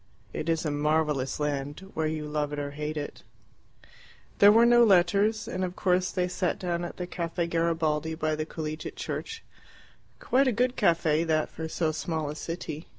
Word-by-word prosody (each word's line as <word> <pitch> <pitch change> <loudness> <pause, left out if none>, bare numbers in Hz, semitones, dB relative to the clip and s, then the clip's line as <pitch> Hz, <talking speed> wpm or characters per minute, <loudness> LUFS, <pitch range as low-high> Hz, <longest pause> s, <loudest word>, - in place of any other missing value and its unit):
It 160 - -3
is 165 0 0
a 150 - 0
marvellous 150 -2 0
land, 145 +5 -3
where 160 -1 0
you 155 -1 -3
love 150 -1 -2
it 150 - -4
or 145 -1 -3
hate 150 +1 -4
it. 145 -1 -5 1.2
There 205 0 +9
were 230 +2 +6
no 240 0 +6
letters, 200 +2 +3
and 185 - -3
of 180 0 -3
course 180 -1 +1
they 180 -1 0
sat 180 0 -1
down 175 -1 -2
at 175 - -6
the 180 - -3
Caffe 170 -1 -3
Garibaldi, 160 -2 0
by 155 -1 -1
the 155 0 -3
Collegiate 155 -1 -5
Church 455 0 -5 0.8
quite 270 +2 +2
a - - +4
good 250 +3 +1
caffe 165 -2 +2
that 155 -1 +1
for 160 - -5
so 160 -1 0
small 155 -1 -3
a - - -7
city. 160 -1 -6
160 Hz, 185 wpm, -28 LUFS, 150-180 Hz, 1.2 s, There